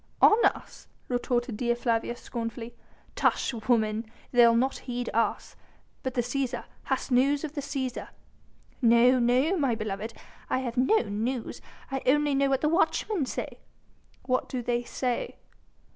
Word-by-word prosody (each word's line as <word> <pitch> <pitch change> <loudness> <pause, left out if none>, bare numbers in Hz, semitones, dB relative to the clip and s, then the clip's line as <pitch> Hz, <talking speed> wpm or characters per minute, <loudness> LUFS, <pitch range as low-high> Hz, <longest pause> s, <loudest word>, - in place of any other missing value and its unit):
"On 440 +2 +6
us!" - - -1 0.2
retorted 245 -2 -1
Dea 240 0 +1
Flavia 235 -1 -1
scornfully. 230 0 -6 0.4
"Tush, - - +1 0.2
woman! 220 -1 +1 0.2
they'll 235 -2 +6
not 260 +3 +1
heed 245 0 -3
us.... 230 +1 -1 0.5
But 260 -1 -4
the 245 - +2
Cæsar... 245 0 -2 0.2
Hast 265 0 -2
news 275 +4 +3
of 305 -2 -4
the 285 - -3
Cæsar?" 270 -3 -4 0.7
"No! 240 +2 +5
no! 255 +9 +3
my 270 -7 +1
beloved, 215 +1 -4 0.3
I - - +1
have 250 -2 -3
no 265 - +3
news. 225 +4 -3 0.3
I 270 -1 -2
only 295 +2 +3
know 275 0 +2
what 270 -1 +1
the 305 - +2
watchmen 335 -1 +1
say." - - -5 0.7
"What 255 -1 0
do 250 -2 -3
they 240 0 0
say?" 245 0 -3
245 Hz, 145 wpm, -27 LUFS, 235-270 Hz, 0.7 s, On